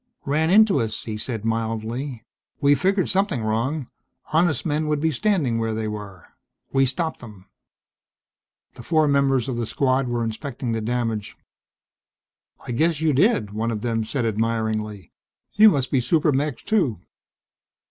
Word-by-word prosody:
"Ran 155 +3 +1
into 205 -4 +5
us," 110 -2 -2
he 110 - -5
said 110 0 -4
mildly. 115 +3 -3 0.4
"We 140 0 +4
figured 190 +6 +1
something 190 - 0
wrong 120 +6 -1 0.5
honest 160 -1 +2
men 155 0 0
would 150 -1 0
be 160 +2 +1
standing 150 - +1
where 115 -1 -1
they 110 0 -2
were. 105 -4 -7 0.5
We 135 0 +4
stopped 160 +4 -2
them." 105 -6 -12 1.3
The - - -11
four 155 +4 +2
members 140 -3 +2
of 130 -3 -3
the 120 -2 -2
Squad 130 0 +1
were 120 -1 -1
inspecting 120 +2 -4
the 115 -1 -1
damage. 115 -2 -2 1.3
"I - - -5
guess 155 +5 +1
you 160 -2 +2
did," 135 - +2
one 110 +2 -2
of 110 -2 -3
them 115 -1 -1
said, 120 +2 -2
admiringly. 110 -2 -2 0.4
"You 215 +1 +8
must 140 -8 -1
be 130 - +2
super 150 +5 +2
mechs 140 0 -1
too?" 165 - +1
125 Hz, 155 wpm, -23 LUFS, 110-150 Hz, 1.3 s, You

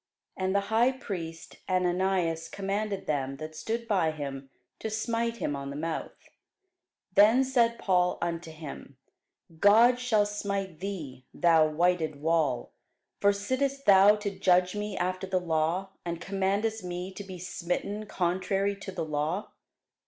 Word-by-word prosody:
And 190 +1 -1
the 200 - +4
high 240 +3 +5
priest 180 - -7
Ananias 180 -2 +1
commanded 200 +1 -3
them 135 -2 -2
that 155 +2 -7
stood 225 +9 -3
by 185 -7 +2
him 140 -3 -6 0.3
to 220 - -3
smite 230 +1 -1
him 145 - -2
on 140 0 -5
the 140 - -6
mouth. 160 +2 -5 0.8
Then 220 +7 +6
said 240 -3 +2
Paul 180 -3 +2
unto 170 -1 -3
him, 155 -4 -9 0.6
God 230 +6 +6
shall 225 -4 +2
smite 200 -4 -3
thee, 155 -10 -6
thou 165 -3 +5
whited 160 -1 +1
wall: 155 - +1 0.5
for 200 - +5
sittest 260 +7 -1
thou 200 +1 +7
to 210 -1 -3
judge 180 0 +3
me 210 -1 -3
after 185 +1 -2
the 185 -1 +1
law, 170 +2 0
and 170 -1 -4
commandest 200 +4 -1
me 180 +1 -5
to 200 - -7
be 190 -2 -8
smitten 185 +4 -3
contrary 190 +2 0
to 195 -1 -7
the 185 - -3
law? 155 +6 -2
185 Hz, 145 wpm, -28 LUFS, 165-205 Hz, 0.8 s, thou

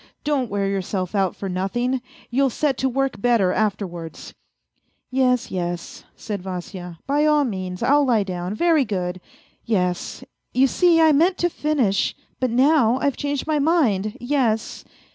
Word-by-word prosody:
Don't 280 -5 0
wear 200 0 -1
yourself 190 -1 -2
out 195 -3 +1
for 195 - -5
nothing 195 +8 -1
I 260 - -1 0.3
You'll 270 +2 +3
set 280 +3 0
to 265 - +1
work 270 -3 -1
better 225 -6 +3
afterwards." 190 -6 -3 0.4
" - - -48 0.3
Yes, 255 -1 +1
yes," 175 -2 -4
said 205 -4 -5
Vasya, 180 -1 -7
" - - -52
by 290 +2 +2
all 300 -1 +4
means, 185 -7 -4
I'll 290 +1 +4
lie 225 -5 +3
down, 180 0 -4
very 325 +2 +3
good. 185 -5 -3 0.4
Yes! 180 -6 -1 0.3
you 260 +2 +5
see 335 +4 +3
I 320 -1 +6
meant 335 +6 +3
to 350 0 0
finish, 275 -12 0 0.2
but 255 - +1
now 255 -1 +4
I've 280 -1 0
changed 285 -1 -2
my 310 -1 +1
mind, 245 - +1
yes. 245 -4 -1
235 Hz, 160 wpm, -22 LUFS, 190-280 Hz, 0.4 s, I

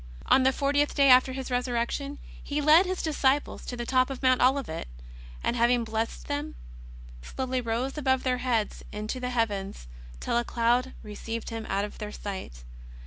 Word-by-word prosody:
On 265 - +5
the 260 +1 +4
fortieth 285 +1 +1
day 280 -1 +5
after 255 +1 +6
His 260 0 -5
Resurrection, 250 +3 -1 0.3
He 290 +1 -2
led 310 +5 +6
His 370 0 -2
disci 285 -2 +2
ples - - -10
to 245 - -5
the 240 - -4
top 255 +1 +2
of 270 -1 -6
Mount 255 -1 +4
Olivet, 255 - +1 0.6
and - - 0
having 240 0 +3
blessed 225 0 -3
them, 290 +2 -3 0.7
slowly 255 - -3
rose 245 +5 -2
above 260 -2 +1
their 255 -1 0
heads 240 -4 -1
into 215 +4 -4
the 250 0 -3
heavens 200 - -2 0.3
till 235 - 0
a - - -1
cloud 240 +2 +1
received 225 +2 -6
Him 225 -1 -5
out 200 +1 0
of 210 - -10
their 210 -1 -5
sight. 190 - -7
250 Hz, 180 wpm, -27 LUFS, 225-270 Hz, 0.7 s, after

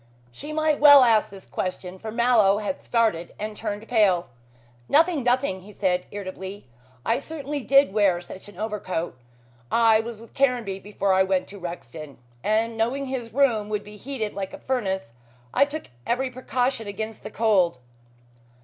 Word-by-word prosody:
She 295 - -8
might 310 -1 +1
well 285 -2 +9
ask 225 -3 +4
this 195 -1 -12
question, 185 0 -4
for 220 +2 -6
Mallow 230 -4 +4
had 215 +7 -3
started 220 -8 0
and 215 0 -5
turned 210 0 -5
pale. 195 - +3 0.6
"Nothing! 325 0 +4
nothing," 245 -6 +1
he 200 +3 -13
said 180 -3 0
irritably. 190 -1 -7 0.4
"I 230 +3 +2
certainly 290 -1 -5
did 275 -4 +4
wear 200 -4 +3
such 185 +3 -10
an 205 - -15
overcoat. 200 - -3 0.6
I 225 -1 +5
was 225 -1 -5
with 230 - -14
Caranby 245 -8 +1
before 200 -1 -1
I 190 - +4
went 190 -1 +1
to 200 - -10
Rexton, 165 -5 -8 0.3
and 225 +2 +1
knowing 250 +5 0
his 255 -3 -4
room 230 -6 +2
would 210 -1 -2
be 210 0 -12
heated 220 -1 -4
like 195 -1 -5
a - - -6
furnace, 190 - -2 0.4
I 280 - +5
took 300 - -7 0.2
every 255 +2 0
precaution 250 -2 -1
against 215 +2 -6
cold." 195 - +3
215 Hz, 160 wpm, -25 LUFS, 195-250 Hz, 0.6 s, well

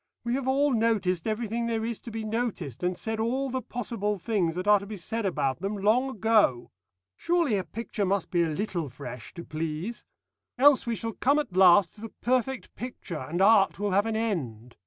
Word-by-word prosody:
We 235 0 -1
have 265 0 -2
all 275 +1 +2
noticed 215 -7 +1
everything 230 +1 -2
there 225 -1 -1
is 230 -1 -3
to - - -9
be 225 0 -5
noticed, 215 - -3
and 180 0 -1
said 220 0 -3
all 260 +4 -1
the 260 0 -2
possible 220 -3 -3
things 185 -4 0
that 180 +2 -4
are 210 -1 +6
to 200 - -9
be 210 0 -6
said 220 +4 -2
about 145 -5 -1
them 200 +2 -2
long 225 +7 +2
ago. 215 - +2 0.4
Surely 335 - +1
a 190 - 0
picture 225 0 -4
must 195 -1 0
be 175 - +2
a 170 - +2
little 170 -2 -3
fresh 125 -1 -9
to 170 - -7
please. 160 +8 -5 0.5
Else 275 -1 +5
we 235 - 0
shall 225 +3 -4
come 280 +7 +2
at 290 -12 -2
last 185 -1 +6
to 210 - -16
the 225 - -6
perfect 255 +1 -1
picture, 240 -9 -6
and 165 +9 -1
art 200 -1 +5
will 205 0 -1
have 200 +3 +2
an 225 - -1
end. 130 - -3
210 Hz, 205 wpm, -27 LUFS, 180-235 Hz, 0.5 s, are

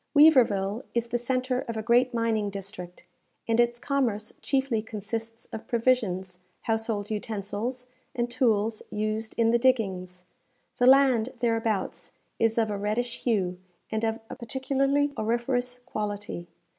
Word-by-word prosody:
Weaverville 235 -9 +5
is 235 0 0
the 240 +1 0
centre 255 +1 0
of 230 -1 -3
a 220 - -3
great 245 +2 +4
mining 225 -3 0
district, 195 -3 -7 0.4
and 230 0 +2
its 240 0 +3
commerce 240 -6 -1
chiefly 265 -5 +1
consists 225 +1 -6
of 225 - -6
provisions, 210 -7 +1 0.2
household 225 -2 -1
utensils, 215 +4 -3 0.3
and 240 -1 0
tools 225 -3 +1
used 215 +1 -2
in 230 -1 +4
the 235 - +3
diggings. 190 -8 0 0.5
The 245 - +4
land 260 -3 +6
thereabouts 225 -4 -1 0.3
is 225 0 +2
of 220 -2 +2
a 200 - -3
reddish 230 +4 -1
hue 185 -7 +1 0.3
and 220 0 -1
of 225 0 0
a - - -7
particularly 275 +3 0
auriferous 245 +3 0
quality. 205 -6 -4
225 Hz, 135 wpm, -27 LUFS, 210-245 Hz, 0.5 s, land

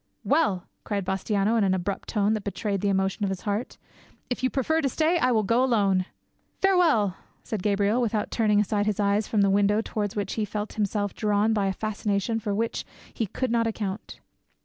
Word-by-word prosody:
"Well," 195 - +1 0.2
cried 200 -3 -2
Bastiano 200 +3 0
in - - +3
an 190 -1 +2
abrupt 190 +2 -3
tone 210 -1 +2
that 215 -2 -2
betrayed 200 -1 -2
the 200 - +1
emotion 195 +2 0
of 200 - +1
his 190 -1 -4
heart, 210 +4 -3 0.5
"if 245 - -2
you 255 - +2
prefer 315 +5 0
to 275 - +1
stay, 320 +6 +1
I 255 - +3
will 220 -3 +2
go 230 +5 +2
alone." 200 -7 +2 0.5
"Farewell," 320 - +3 0.3
said 215 -4 -4
Gabriel, 205 +4 +2
without 215 -3 -1
turning 210 -3 +2
aside 210 0 +1
his 210 -1 0
eyes 205 +1 +1
from 215 - +1
the 200 - +4
window 205 +1 +3
towards 210 -2 -3
which 200 -2 -2
he 220 - -1
felt 210 +1 -4
himself 205 -1 -1
drawn 210 +1 +1
by 205 -2 +1
a - - +1
fascination 215 +1 -1
for 205 -2 -2
which 225 +2 -1 0.3
he 225 - -2
could 255 +5 -2
not 230 -1 +2
account. 210 -2 -5
210 Hz, 200 wpm, -26 LUFS, 200-225 Hz, 0.5 s, the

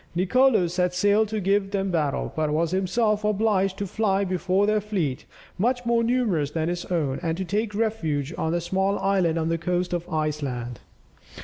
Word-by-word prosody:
Nicolo 220 +3 +3
set 180 +1 -1
sail 205 +3 +3
to 215 +1 -3
give 195 0 +1
them 195 -1 -1
battle, 150 -5 -1
but 155 -1 0
was 160 +2 0
himself 210 +3 +1
obliged 205 -2 +1
to 200 - -2
fly 200 0 0
before 185 +1 +1
their 215 0 +2
fleet, 185 -11 -2 0.3
much 245 +4 0
more 235 0 +2
numerous 225 - +1
than 160 +2 -2
his 175 0 -3
own, 150 -7 -1
and 165 -1 -2
to 190 - -3
take 210 +3 -2
refuge 165 -10 -1
on 160 - -1
a 175 - 0
small 190 +3 0
island 185 -4 +1
on 160 0 0
the 165 0 0
coast 180 +2 -1
of 175 0 -3
Iceland. 140 -7 -3
185 Hz, 185 wpm, -25 LUFS, 165-210 Hz, 0.3 s, Nicolo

